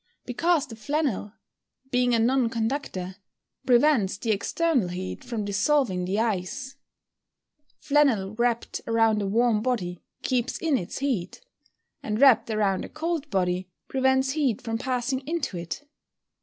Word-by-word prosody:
_ -, -, -49 dB
Because 320 Hz, +4 st, +1 dB
the 235 Hz, -6 st, -10 dB
flannel, 260 Hz, -4 st, -2 dB, 0.6 s
being 245 Hz, -1 st, +3 dB
a -, -, +3 dB
non 240 Hz, +1 st, +2 dB
conductor, 225 Hz, -6 st, -3 dB, 0.5 s
prevents 240 Hz, -6 st, +4 dB
the 225 Hz, +2 st, -1 dB
external 255 Hz, -, +1 dB
heat 180 Hz, +1 st, -5 dB
from 230 Hz, -4 st, -3 dB
dissolving 200 Hz, -2 st, +1 dB
the 190 Hz, +3 st, -1 dB
ice. 235 Hz, +6 st, -2 dB, 1.0 s
Flannel 255 Hz, -10 st, +2 dB
wrapped 235 Hz, +1 st, -1 dB
around 225 Hz, -2 st, +3 dB
a 200 Hz, -, -1 dB
warm 225 Hz, +1 st, +2 dB
body 210 Hz, -8 st, -2 dB, 0.2 s
keeps 255 Hz, 0 st, 0 dB
in 320 Hz, -4 st, +1 dB
its 180 Hz, -9 st, -3 dB
heat; 245 Hz, -11 st, -2 dB, 0.6 s
and 215 Hz, 0 st, -2 dB
wrapped 270 Hz, -4 st, +6 dB
around 205 Hz, -3 st, +1 dB
a -, -, -7 dB
cold 315 Hz, -1 st, -3 dB
body, 185 Hz, -2 st, 0 dB, 0.2 s
prevents 265 Hz, 0 st, +2 dB
heat 275 Hz, -7 st, 0 dB
from 225 Hz, -1 st, -3 dB
passing 255 Hz, 0 st, -1 dB
into 320 Hz, -, -2 dB
it. 170 Hz, -, -5 dB
235 Hz, 140 wpm, -26 LUFS, 200-270 Hz, 1.0 s, wrapped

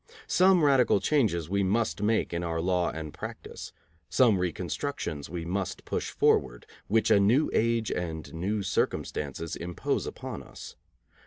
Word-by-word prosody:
Some 185 Hz, -2 st, +4 dB
radical 135 Hz, -7 st, +4 dB
changes 105 Hz, -, +1 dB
we 100 Hz, +3 st, 0 dB
must 105 Hz, +2 st, 0 dB
make 110 Hz, -3 st, +1 dB
in 85 Hz, -, -1 dB
our 80 Hz, -1 st, -2 dB
law 90 Hz, +1 st, +1 dB
and 80 Hz, -2 st, -6 dB
practice. -, -, -8 dB, 0.4 s
Some 115 Hz, -7 st, +4 dB
reconstructions 90 Hz, -, -3 dB
we 85 Hz, -1 st, -5 dB
must 95 Hz, +1 st, -3 dB
push -, -, -2 dB
forward, -, -, +1 dB, 0.2 s
which 110 Hz, +1 st, +2 dB
a 105 Hz, -, +6 dB
new 115 Hz, +10 st, +3 dB
age 115 Hz, -1 st, +1 dB
and 80 Hz, -3 st, -4 dB
new 100 Hz, +5 st, -2 dB
circumstances 80 Hz, -4 st, -2 dB
impose 85 Hz, 0 st, -2 dB
upon -, -, -6 dB
us. -, -, -11 dB
95 Hz, 145 wpm, -28 LUFS, 85-115 Hz, 0.4 s, a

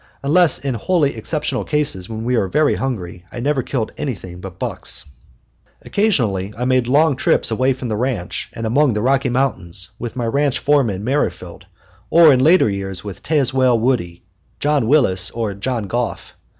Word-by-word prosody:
Unless 165 Hz, +4 st, +5 dB
in 135 Hz, 0 st, -3 dB
wholly 145 Hz, -, 0 dB
exceptional 150 Hz, +7 st, -3 dB
cases, 140 Hz, -12 st, -1 dB
when 110 Hz, 0 st, -5 dB
we 125 Hz, +2 st, 0 dB
were 100 Hz, -5 st, +1 dB
very 150 Hz, +10 st, +2 dB
hungry, 90 Hz, -10 st, -4 dB
I -, -, -7 dB
never 140 Hz, +2 st, 0 dB
killed 120 Hz, -3 st, -3 dB
anything 95 Hz, -10 st, -5 dB
but 95 Hz, -2 st, -9 dB
bucks. -, -, -4 dB, 0.8 s
Occasionally 115 Hz, -, 0 dB
I 125 Hz, -, -2 dB
made 130 Hz, -1 st, +2 dB
long 145 Hz, +3 st, +3 dB
trips 125 Hz, -, +2 dB
away 130 Hz, +4 st, +2 dB
from 125 Hz, -1 st, -6 dB
the 110 Hz, -, -2 dB
ranch 115 Hz, -6 st, -3 dB
and 115 Hz, -, -5 dB
among 130 Hz, +3 st, +2 dB
the 105 Hz, -, -1 dB
Rocky 135 Hz, 0 st, +2 dB
Mountains 95 Hz, -9 st, -2 dB
with 120 Hz, -2 st, -6 dB
my 120 Hz, -2 st, -2 dB
ranch 140 Hz, +3 st, +1 dB
foreman 125 Hz, -10 st, +1 dB
Merrifield; 95 Hz, -9 st, -3 dB, 0.4 s
or 165 Hz, -3 st, +7 dB
in 130 Hz, -, +2 dB
later 160 Hz, +5 st, +5 dB
years 95 Hz, -2 st, -4 dB
with 100 Hz, -4 st, -8 dB
Tazewell 130 Hz, -5 st, +2 dB
Woody, 110 Hz, -9 st, -1 dB, 0.4 s
John 145 Hz, -5 st, +1 dB
Willis, 95 Hz, -10 st, +3 dB
or 110 Hz, -2 st, -3 dB
John 115 Hz, +3 st, -3 dB
Goff. 120 Hz, +2 st, -4 dB
125 Hz, 170 wpm, -19 LUFS, 100-140 Hz, 0.8 s, or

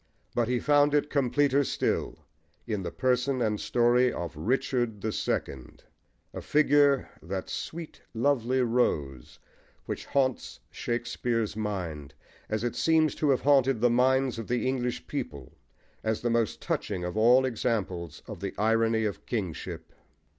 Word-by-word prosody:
But 120 Hz, -2 st, +1 dB
he 125 Hz, 0 st, +1 dB
found 145 Hz, +1 st, +3 dB
it 150 Hz, 0 st, +1 dB
completer 140 Hz, +1 st, +2 dB
still -, -, -1 dB, 0.5 s
in 105 Hz, -2 st, -2 dB
the 90 Hz, -, -3 dB
person 130 Hz, +1 st, 0 dB
and 105 Hz, -3 st, 0 dB
story 120 Hz, +1 st, +3 dB
of 85 Hz, -2 st, -5 dB
Richard 115 Hz, -, -1 dB
the 110 Hz, -, -1 dB
Second, 65 Hz, -10 st, -3 dB, 0.5 s
a -, -, -5 dB
figure 145 Hz, -2 st, +3 dB
"that 95 Hz, +3 st, -5 dB
sweet 165 Hz, -1 st, -6 dB
lovely 130 Hz, 0 st, +1 dB
rose" 75 Hz, -, -1 dB, 0.5 s
which -, -, -5 dB
haunts 130 Hz, -3 st, 0 dB
Shakespeare's 120 Hz, -2 st, -2 dB
mind, 90 Hz, -9 st, -4 dB, 0.3 s
as 110 Hz, +1 st, -1 dB
it 120 Hz, -, -2 dB
seems 160 Hz, -1 st, +3 dB
long -, -, -14 dB
to 150 Hz, -, +2 dB
have 135 Hz, -, +3 dB
haunted 135 Hz, -3 st, +4 dB
the 120 Hz, +1 st, +3 dB
minds 130 Hz, 0 st, +2 dB
of 115 Hz, -, -6 dB
the 125 Hz, +1 st, 0 dB
English 125 Hz, -2 st, -2 dB
people, 70 Hz, -4 st, -6 dB, 0.5 s
as 110 Hz, 0 st, -1 dB
the 120 Hz, -, 0 dB
most 115 Hz, -2 st, 0 dB
touching 95 Hz, -4 st, -2 dB
of 90 Hz, +2 st, -4 dB
all 120 Hz, +4 st, +5 dB
examples 105 Hz, -, -2 dB
of -, -, -7 dB
the -, -, -5 dB
irony 110 Hz, +1 st, +2 dB
of 105 Hz, -, -4 dB
kingship. 95 Hz, -9 st, -4 dB
120 Hz, 145 wpm, -28 LUFS, 105-130 Hz, 0.5 s, all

